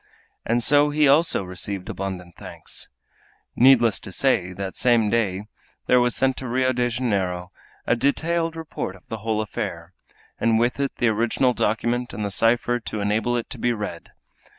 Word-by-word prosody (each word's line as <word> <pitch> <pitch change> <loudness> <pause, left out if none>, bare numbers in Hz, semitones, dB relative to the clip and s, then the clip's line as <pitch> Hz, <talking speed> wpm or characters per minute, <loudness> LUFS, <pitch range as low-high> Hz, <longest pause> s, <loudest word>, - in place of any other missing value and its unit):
And 120 +1 +1
so 145 +2 +4
he 150 0 +3
also 145 -5 +4
received 90 +1 -4
abundant 95 -2 -5
thanks. - - -4 0.7
Needless 120 -4 +5
to - - -9
say 100 -5 +1
that 95 +1 -5
the - - -4
same 115 -4 +3
day 100 -4 0 0.4
there 125 - +4
was 120 0 +1
sent 135 -1 +1
to 130 - -5
Rio 130 +2 +1
de 120 0 0
Janeiro 95 -7 -2 0.3
a - - +2
detailed 165 +6 0
report 160 - -5
of 95 - -20
the 110 - -4
whole 110 0 -1
affair, 105 - -5 0.5
and 115 -1 +2
with 120 +4 +1
it 140 -1 -1
the 120 - +2
original 120 +4 +1
document 120 +3 -1
and 105 - -3
the 100 - -3
cipher 120 +3 +2
to 110 -2 -5
enable 110 +4 0
it 115 - -4
to - - -6
be 120 - +1
read. 105 -6 -6
115 Hz, 175 wpm, -23 LUFS, 100-125 Hz, 0.7 s, Needless